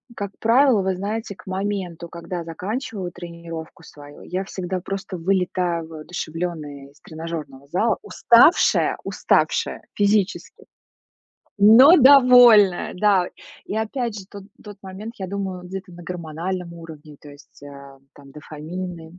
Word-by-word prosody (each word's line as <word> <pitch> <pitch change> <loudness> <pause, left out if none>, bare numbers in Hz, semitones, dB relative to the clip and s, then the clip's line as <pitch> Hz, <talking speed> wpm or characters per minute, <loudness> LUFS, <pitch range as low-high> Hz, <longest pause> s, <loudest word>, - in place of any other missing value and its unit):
как 200 -2 -5
правило, 235 -1 +4
вы 190 0 -1
знаете, 205 +2 -5
к 185 - -18
моменту, 185 -3 -4
когда 170 0 -6
заканчиваю 190 - -5
тренировку 170 -1 -10
свою, 145 -2 -14
я 185 +2 -4
всегда 185 -1 -5
просто 195 0 -6
вылетаю 175 -2 -1
воодушевлённая 155 -3 -6
из 145 - -26
тренажёрного 155 -4 -8
зала. 200 +8 0
Уставшая 240 +9 +4
уставшая - - 0
физически, 205 -1 -1 0.9
но 240 - +8
довольная, 245 -8 +6
да. 190 -1 +2 0.4
И 210 - -5
опять 220 0 -3
же, 190 - -11
тот 200 -2 -10 0.2
тот 205 -2 -11
момент, 200 +4 -9
я 190 - -5
думаю, 190 -2 -5
где-то 185 +1 -8
на 175 0 -12
гормональном 175 +1 -5
уровне, 155 -3 -12
то 150 - -14
есть, 145 0 -18
э, 140 -1 -12 0.2
там, 140 -1 -16
дофамины, 165 +3 -8
180 Hz, 130 wpm, -22 LUFS, 165-205 Hz, 0.9 s, но